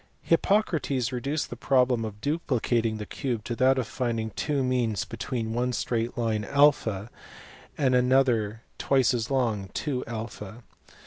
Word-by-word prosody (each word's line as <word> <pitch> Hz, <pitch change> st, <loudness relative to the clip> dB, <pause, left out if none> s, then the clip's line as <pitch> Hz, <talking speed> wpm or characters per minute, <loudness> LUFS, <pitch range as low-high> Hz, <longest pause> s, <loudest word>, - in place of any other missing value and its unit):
Hippocrates 165 Hz, -, +1 dB
reduced 140 Hz, +5 st, -2 dB
the -, -, -4 dB
problem 125 Hz, -2 st, +2 dB
of 105 Hz, -1 st, -8 dB
duplicating 120 Hz, -7 st, 0 dB
the 105 Hz, -, -5 dB
cube 120 Hz, -2 st, -3 dB
to 120 Hz, -, -4 dB
that 130 Hz, +1 st, +4 dB
of 130 Hz, -, 0 dB
finding 115 Hz, -1 st, -2 dB
two 145 Hz, +2 st, -1 dB
means 120 Hz, -5 st, 0 dB
between 115 Hz, -4 st, -4 dB
one 125 Hz, +1 st, 0 dB
straight 115 Hz, 0 st, -2 dB
line 110 Hz, -3 st, 0 dB
(a), 115 Hz, -6 st, +2 dB, 0.7 s
and 130 Hz, -3 st, +2 dB
another 125 Hz, -4 st, +2 dB, 0.2 s
twice 135 Hz, -2 st, +3 dB
as 120 Hz, -1 st, -2 dB
long 115 Hz, -7 st, 0 dB
(2a). 115 Hz, -5 st, -5 dB
125 Hz, 135 wpm, -27 LUFS, 115-135 Hz, 0.7 s, that